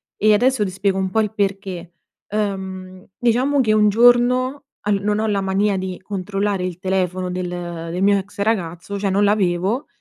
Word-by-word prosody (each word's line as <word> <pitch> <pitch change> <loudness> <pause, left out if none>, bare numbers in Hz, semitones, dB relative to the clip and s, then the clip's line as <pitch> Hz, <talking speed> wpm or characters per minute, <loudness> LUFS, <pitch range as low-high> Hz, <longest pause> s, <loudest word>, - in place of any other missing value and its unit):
e 215 +1 +4
adesso 245 +1 +3
ti 190 - -3
spiego 195 +1 0
un 190 -1 0
po' 220 - 0
il 210 0 -2
perché. 195 -4 -3 0.4
Uhm, 190 -3 -4
diciamo 255 +4 +2
che 220 -4 +2
un 210 -1 +4
giorno, 245 +5 +3 0.2
al 200 -1 +1
non 210 +1 0
ho 220 - 0
la 200 -2 0
mania 195 +1 +1
di 185 -1 -4
controllare 195 0 -2
il 180 -1 -5
telefono 185 -1 -1
del 180 0 -3 0.4
del 180 +2 -3
mio 200 +1 +4
ex 200 +1 -11
ragazzo, 200 -2 -2
cioè 200 0 -1
non 200 +2 +2
l'avevo, 200 +4 +1
200 Hz, 180 wpm, -20 LUFS, 185-215 Hz, 0.4 s, e